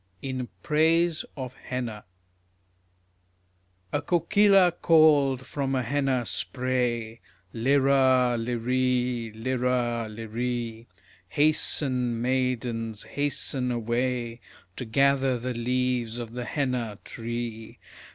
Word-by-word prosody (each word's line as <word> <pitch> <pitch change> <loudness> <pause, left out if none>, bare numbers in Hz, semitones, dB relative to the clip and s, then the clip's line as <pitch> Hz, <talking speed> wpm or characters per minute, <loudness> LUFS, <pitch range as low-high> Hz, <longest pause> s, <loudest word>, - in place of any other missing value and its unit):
IN 130 -2 -4
PRAISE 165 +1 +2
OF 130 -2 -5
HENNA 120 -6 -5 1.9
A 145 - +1
kokila 180 +3 +4
called 145 -6 +4
from 135 -2 -2
a 130 - 0
henna 135 -1 0
spray: 120 -3 -1 0.3
LIRA! 130 0 +3
LIREE! 125 0 0
LIRA! 120 -1 -1
LIREE! 115 +1 -4 0.4
Hasten, 130 - +1
maidens, 120 -3 -1
hasten 140 -2 -2
away 120 0 -2 0.3
To 125 - -5
gather 135 +1 +2
the 125 +2 -3
leaves 125 -1 -1
of 115 -1 -6
the 125 0 -4
henna 125 -7 -2
tree. 115 -1 -6
125 Hz, 90 wpm, -26 LUFS, 120-135 Hz, 1.9 s, kokila